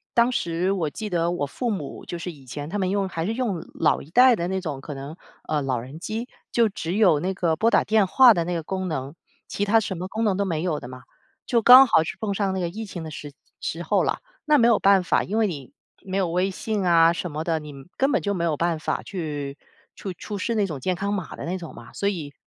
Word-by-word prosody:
当 235 +1 +4
时 175 -2 -1
我 170 -6 -1
记 215 +7 -6
得 170 -2 +1
我 175 -5 -1
父 240 - -3
母 185 -10 -5
就 175 - -5
是 175 +1 -5
以 140 -4 -16
前 145 +4 -6
他 205 +5 -3
们 185 -1 0
用 200 0 0
还 165 -2 -3
是 220 - -1
用 230 -9 -1 0.2
老 - - +2
一 145 - -13
代 250 +6 +6
的 170 0 -2
那 190 +1 -1
种 150 -7 -5
可 150 - -7
能， 140 +3 -7 0.3
呃， 150 -1 0
老 130 -3 -1
人 130 +7 -9
机， 220 +6 -4 0.2
就 230 -2 +3
只 180 -3 -4
有 185 -8 +4
那 185 +5 -1
个 170 -3 0
拨 220 +8 +2
打 - - +3
电 215 -3 +3
话 250 +4 +7
的 170 - 0
那 175 +1 -2
个 165 - -3
功 185 +2 -3
能， 140 -3 -4 0.3
其 205 - -2
他 220 +2 +4
什 205 -3 -3
么 185 - -4
功 220 +4 -3
能 205 -4 +2
都 200 - 0
没 165 -3 -2
有 160 -5 -1
的 120 - -9
嘛。 130 0 -10 0.4
就 235 -2 +2
刚 255 +4 +10
好 160 -9 +4
是 170 - -6
碰 210 -2 -2
上 195 -1 0
那 - - -1
个 175 -2 -1
疫 220 +5 -6
情 175 -4 -7
的 160 - -7
时 145 -1 -8 0.3
时 170 +2 -3
候 165 - +2
了， - - -1 0.3
那 300 -1 +5
没 235 -3 +5
有 230 -3 +4
办 195 -1 +5
法， - - +2
因 210 - -3
为 225 - +3
你 145 - -5 0.3
没 190 0 -3
有 190 -2 +1
微 180 +3 0
信 205 +1 -3
啊 170 -1 +5
什 175 -1 -4
么 155 +2 -3
的， 165 -1 0
你 150 -1 -9 0.3
根 270 +2 +2
本 - - +2
就 200 - -1
没 175 -3 -2
有 160 -3 0
办 170 0 0
法 - - -2
去 145 -6 -5 0.4
出 195 - -6
出 205 +4 -7
示 230 +4 -1
那 210 - +2
种 155 -7 -5
健 185 +7 -1
康 200 +3 -2
码 185 -5 -4
的 - - -7
那 180 +3 -2
种 165 -3 -9
嘛。 - - -13
所 200 - 0
以， 155 -7 -5
180 Hz, 290 characters per minute, -24 LUFS, 160-205 Hz, 0.4 s, 刚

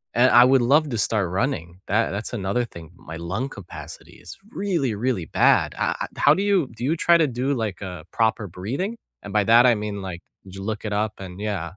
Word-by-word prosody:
And 125 +2 +5
I 120 - +8
would 130 0 +4
love 145 +5 +3
to 120 - -2
start 105 -3 +1
running. 90 -4 -2
That 110 +3 +1
that's 105 +5 -4
another 110 +2 -1
thing. 85 -6 -12
My 80 -1 -10
lung 90 +10 -3
capacity 100 -8 -10
is - - -10
really, 170 - -1
really 110 -5 -1
bad. - - +3
I - - 0
I - - -2
how 145 - +6
do 190 - -1
you 195 -9 +2
do 115 - -8
you 160 +5 +1
try 170 +1 +4
to 160 -2 +3
do 130 +2 -1
like 110 -6 -3
a 90 -5 -7
proper 110 -2 0
breathing? 125 - -4 0.3
And 105 - -8
by 105 -1 +3
that 120 +4 +6
I 120 - +5
mean 105 -1 -4
like, 95 -3 -6 0.3
did 95 0 -12
you 95 - -7
look 110 +1 -4
it 105 - -3
up 105 +1 0
and 95 -1 -9
yeah. 105 -4 -2
110 Hz, 230 wpm, -23 LUFS, 95-130 Hz, 0.3 s, I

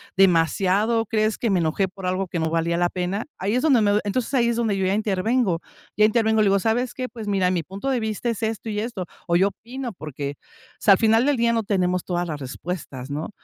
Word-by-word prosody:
demasiado? 195 +5 +3
¿Crees 215 0 0
que 230 - -1
me 190 -3 +2
enojé 165 +4 +1
por 190 0 -9
algo 185 +1 -1
que 170 - -3
no 160 0 0
valía 165 +1 0
la 175 0 +3
pena?". 185 +4 -2
Ahí 200 +5 0
es 255 - +2
donde 270 -8 +4
me 205 -1 +3
doy 210 - +2
entonces, 250 +6 -2
ahí 235 -2 +3
es 235 - +1
donde 220 -4 0
yo 190 - 0
ya 190 - +2
intervengo, 210 -2 +1 0.4
ya 215 - +6
intervengo, 220 0 +2
le - - +4
digo: 195 0 +3
"¿Sabes 235 +4 0
qué?, 255 -1 -4
pues, 220 -2 -8
mira, 190 -3 +2
mi 170 -3 0
punto 195 - -5
de 255 -2 +1
vista 220 +2 -2
es 230 - -3
esto 220 0 -2
y 210 0 -2
esto, 215 -5 -4 0.2
o 170 - +2
yo 190 +3 +4
opino", 245 +3 -7
porque, 145 -1 -5
o - - -32 0.3
sea, 205 - +4
al - - +4
final 225 +2 +4
del 290 -1 +3
día 235 0 +2
no 225 -1 +1
tenemos 180 -3 0
todas 175 -1 -2
las 150 -2 -4
respuestas, 140 -1 -6
¿no? 150 +6 -4
200 Hz, 250 wpm, -23 LUFS, 180-225 Hz, 0.4 s, ya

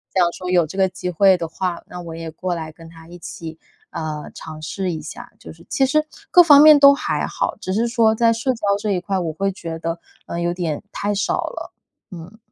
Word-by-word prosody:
想 180 -2 +4
说 180 - -6
有 175 -3 +3
这 160 - -10
个 190 0 +3
机 180 0 -5
会 190 +2 +4
的 165 - -4
话， 175 +1 -4
那 180 - -9
我 165 -2 -8
也 165 -1 -7
过 180 +2 -3
来 160 -1 -6
跟 165 +1 -15
他 165 0 -15
一 175 +1 -11
起， 165 -1 -9 0.3
呃 155 -2 -5
尝 155 -1 -9
试 185 +4 -3
一 160 -2 -5
下。 150 - -10
就 - - -11
是 170 +1 -19
其 270 - +2
实 305 +3 +1 0.3
各 355 - +8
方 290 -3 +8
面 305 -1 +8
都 280 0 +8
还 - - -2
好， - - -2
只 185 - -4
是 230 +4 +1
说 230 -2 +3
在 230 0 +3
社 230 +4 -1
交 230 - -12 0.2
这 210 0 -2
一 185 - +1
块， 195 +1 -2
我 165 -3 -3
会 195 +5 -1
觉 165 -4 -7
得， 165 +1 -4 0.3
呃， 170 - -4
有 175 0 -1
点 170 -3 -3
太 205 +1 -2
少 200 - 0
了， - - -7 0.4
嗯。 180 +4 -11
180 Hz, 255 characters per minute, -20 LUFS, 165-205 Hz, 0.4 s, 各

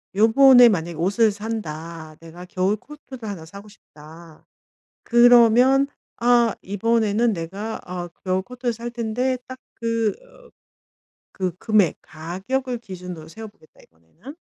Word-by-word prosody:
'요번에 245 +3 +7
만약에 170 -4 -2
옷을 205 +6 +2
산다. 165 -7 -7
내가 170 +2 -11
겨울 185 +3 0
코트를 260 -2 -11
하나 170 -6 -7
사고 200 +5 -12
싶다.' 160 -4 -16 0.6
그러면 245 +3 +5 0.3
'아 240 -1 +3
이번에는 220 +2 0
내가 195 +6 -5
아 180 -1 -6 0.2
겨울 185 0 0
코트를 245 0 -4
살 235 +1 -7
텐데 245 +2 -2
딱 260 0 -8 0.2
그 230 -2 0
어 - - -20 0.8
그 185 -3 -3
금액 210 -5 +2
가격을 195 +11 -4
기준으로 180 -7 -9
세워 220 +6 -9
보겠다 155 -6 -23
이번에는.' 85 - -15
215 Hz, 265 characters per minute, -22 LUFS, 175-240 Hz, 0.8 s, 요번에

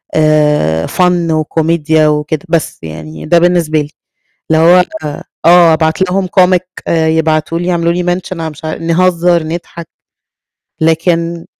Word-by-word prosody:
آآ، 150 - +1
fun 175 -2 0
وكوميديا 155 0 +1
وكده، 150 +2 -2
بس 165 -3 -1
يعني 80 - -9
ده 170 +2 +3
بالنسبة 170 -3 +1
لي. 145 - -7 0.6
اللي 160 0 +3
هو 180 +2 +5 0.6
آه 170 -1 +6
أبعت 160 +2 0
لهم 190 0 0
comic 180 -1 +4 0.3
آآ 160 -1 +1
يبعتوا 160 0 0
لي 175 - -4
يعملوا 170 -1 0
لي 180 0 -1
mention 185 +1 -7
على 160 - -3
مش 150 +1 -14
ع 155 - -3
نهزر، 170 0 +1
نضحك. 170 +1 -7 1.0
لكن 165 +1 0
165 Hz, 140 wpm, -12 LUFS, 155-175 Hz, 1.0 s, آه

